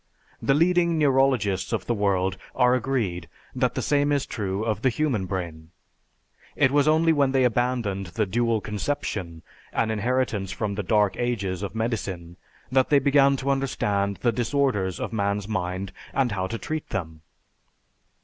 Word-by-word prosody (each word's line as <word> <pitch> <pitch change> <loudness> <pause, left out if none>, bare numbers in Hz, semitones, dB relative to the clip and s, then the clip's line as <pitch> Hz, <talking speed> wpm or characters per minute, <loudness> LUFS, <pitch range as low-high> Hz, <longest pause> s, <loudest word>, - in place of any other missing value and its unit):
The 135 - +2
leading 170 +1 +3
neurologists 130 -10 +2
of - - -2
the 120 - 0
world 95 -3 +1 0.2
are 125 -1 +4
agreed 115 - -1 0.2
that - - 0
the - - -2
same 145 0 +2
is 145 -2 +1
true 100 -1 -3
of 110 -2 -1
the 130 - +3
human 120 -7 -1
brain. 85 -4 -5 0.9
It 135 -3 +3
was 145 0 +3
only 160 +1 +4
when 140 -3 +2
they 135 -1 +3
abandoned 120 -5 0
the 105 +5 -1
dual 115 +2 0
conception 100 - -4 0.3
an 110 -1 0
inheritance 110 -3 -1
from 105 -2 -2
the 100 - -2
dark 105 +1 +2
ages 100 -7 -2
of 100 +1 -5
medicine 95 -7 -3 0.3
that 130 0 +3
they 145 - +5
began 140 0 +4
to 135 +1 -1
understand 100 -7 0
the 120 - +4
disorders 115 -6 0
of - - -4
man's 100 -1 -1
mind 95 -2 -3 0.2
and 135 -3 +2
how 95 -2 -2
to 115 - -4
treat 155 +5 -5
them. 80 -4 -5
110 Hz, 160 wpm, -25 LUFS, 95-135 Hz, 0.9 s, they